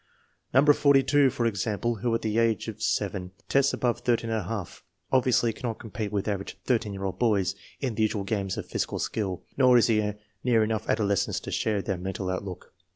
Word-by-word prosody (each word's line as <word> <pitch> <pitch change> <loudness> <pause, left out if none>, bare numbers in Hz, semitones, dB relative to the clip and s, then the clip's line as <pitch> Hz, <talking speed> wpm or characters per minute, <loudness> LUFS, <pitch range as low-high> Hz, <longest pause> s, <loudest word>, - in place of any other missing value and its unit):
No. 130 +3 +5
42, 140 -1 +5
for 120 -1 -2
example, 110 +2 -1
who 115 +2 0
at - - -2
the 110 +1 +1
age 115 -1 +1
of 110 -1 -7
7 95 -3 -1
tests 140 0 +3
above 120 -2 -1
ISi, 115 -4 -2 0.3
obviously 125 -3 +3
cannot 115 -2 -4
compete 110 -2 -5
with 100 -1 -1
average 100 -2 -3
13 115 -5 +1
year 100 0 -6
old 95 -1 -4
boys 100 -6 +2 0.3
in 130 -4 -1
the 110 - -2
usual 105 -2 +1
games 100 -2 -2
of - - -5
physi - - -2
cal - - -3
skill, 95 -5 -3
nor 130 -2 +6
is 120 - +5
he 105 -2 +1 0.3
near 115 -3 +4
enough 110 0 -2
adolescence 100 -3 +1
to - - -7
share 105 -3 0
their 95 - -2
mental 95 +1 -3
outlook. 95 0 -6
110 Hz, 190 wpm, -27 LUFS, 100-120 Hz, 0.3 s, nor